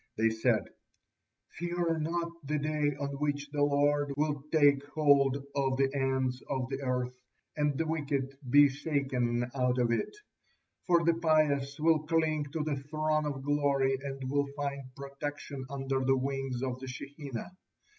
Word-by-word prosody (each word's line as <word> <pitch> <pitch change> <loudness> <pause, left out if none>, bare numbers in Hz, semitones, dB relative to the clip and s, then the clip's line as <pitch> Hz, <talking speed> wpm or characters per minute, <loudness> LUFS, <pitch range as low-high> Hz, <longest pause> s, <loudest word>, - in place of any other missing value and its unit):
They 110 +1 +3
said: 110 0 +2 1.0
"Fear 175 -1 0
not 170 +2 -1
the 150 +2 -1
day 150 -1 0
on 140 -1 -2
which 145 -1 -2
the 145 -1 -1
Lord 145 0 +2
will 150 -1 0
'take 145 -3 +5
hold 140 -3 +4 0.2
of 135 -2 +1
the 135 0 +2
ends 130 -2 0
of 130 -3 -1
the 135 +1 -3
earth, 125 -1 -1 0.4
and 150 -2 +1
the 165 - 0
wicked 140 -4 -2
be 145 +3 +8
shaken 135 -4 -1
out 125 -2 +1
of 120 -1 +2
it,' 115 - -1 0.7
for 170 -2 +4
the 170 0 +4
pious 155 -4 +2
will 160 0 +4
cling 155 -1 +1
to 150 +2 -3
the 150 -2 -1
Throne 155 +2 -1
of 135 -2 -4
Glory 140 -2 +2
and 135 -1 -5
will 140 +1 +1
find 140 -1 -2
protection 140 0 -6
under 135 -1 -1
the 135 +1 +3
wings 135 -1 -2
of 130 -1 -2
the 130 - -7
Shekinah. 140 +1 -7
140 Hz, 155 wpm, -31 LUFS, 135-150 Hz, 1.0 s, be